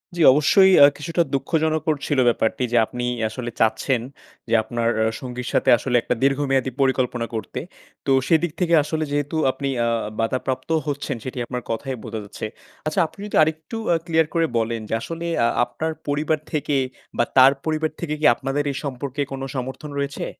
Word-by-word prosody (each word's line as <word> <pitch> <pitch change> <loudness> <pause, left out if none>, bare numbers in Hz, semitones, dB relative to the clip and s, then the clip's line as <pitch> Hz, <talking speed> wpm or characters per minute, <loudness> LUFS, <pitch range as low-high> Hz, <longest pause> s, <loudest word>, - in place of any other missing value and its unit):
জি 170 - -1
অবশ্যই 190 +7 +5
আ - - +12
কিছুটা 165 +3 -1
দুঃখজনক 155 +1 +1
ছিল 145 -3 +1
ব্যাপারটি 115 +1 0
যে 120 - +4
আপনি 125 +2 -6 0.3
আসলে 120 +2 -5
চাচ্ছেন, 115 +3 +2 0.5
যে - - -1
আপনার 115 +1 -2 0.2
আ - - +2 0.2
সঙ্গীর 125 -1 -6
সাথে - - +2
আসলে 125 - -2
একটা 125 - -1
দীর্ঘমেয়াদী 135 -1 +1
পরিকল্পনা 125 -3 +1
করতে। 110 -4 -4 0.5
তো 135 - +1 0.2
সেদিক 165 0 +2
থেকে 170 -2 +1
আসলে 155 +1 -2
যেহেতু 145 +1 -1 0.2
আপনি 140 +1 -4 0.2
আ - - +1 0.3
বাধাপ্রাপ্তও 130 +6 -1
হচ্ছেন 145 -2 -2
সেটি 130 0 -6
আপনার 125 0 -4
কথায়ই 130 +1 -3
বোঝা 110 - -5
যাচ্ছে। 100 +1 -7 0.4
আচ্ছা 155 - 0
আপনি 195 - -21
যদি 210 - -5
আরেকটু 160 +8 -3 0.2
আ - - +4
ক্লিয়ার 160 -2 +2
করে 165 -1 +2
বলেন 115 0 -1
যে - - -2
আসলে 165 +4 -5 0.2
আ - - +4 0.2
আপনার 160 +6 -3 0.2
পরিবার 150 +2 0
থেকে, 150 -2 -1 0.4
বা - - +4
তার 130 +1 +9
পরিবার 155 0 0
থেকে 160 -3 -2
কি 155 - -1
আপনাদের 135 +3 -2
এই 135 - -5
সম্পর্কে 140 +1 -4
কোন 135 - -5
সমর্থন 130 +4 -5
রয়েছে? 140 0 -3
140 Hz, 175 wpm, -22 LUFS, 125-155 Hz, 0.5 s, আ